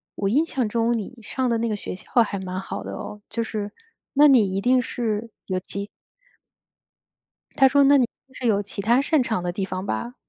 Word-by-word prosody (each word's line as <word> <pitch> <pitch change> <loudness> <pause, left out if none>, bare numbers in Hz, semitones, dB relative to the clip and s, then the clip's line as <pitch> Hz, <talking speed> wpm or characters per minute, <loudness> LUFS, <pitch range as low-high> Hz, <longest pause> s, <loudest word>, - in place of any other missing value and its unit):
我 195 -1 -1
印 295 +9 +3
象 255 -8 -1
中 230 +2 +1
你 225 +4 -6
上 255 +4 -2
的 230 - +2
那 230 0 0
个 210 - 0
学 180 - -6
校 - - -13 0.2
还 205 -2 -4
蛮 185 0 -4
好 195 +1 -5
的 - - -6
哦， 210 0 -7
就 230 - -2
是 210 -2 -4 0.4
那 295 +2 +7
你 220 -9 +5
一 - - +1
定 250 +4 +3
是 225 -2 -3 0.2
有 185 -1 -1
其 200 +2 -5 1.7
她 270 - +7
说， 280 +1 +4
那 285 +1 +6
你 250 - +4
一 - - 0 0.2
定 260 - -25
是 250 - -4
有 205 -2 +3
其 200 0 -6
它 240 +5 +4
擅 300 -2 +2
长 220 -6 -1
的 175 - -1
地 195 +1 -2
方 185 0 -4
吧。 235 +4 -3
225 Hz, 240 characters per minute, -24 LUFS, 200-250 Hz, 1.7 s, 那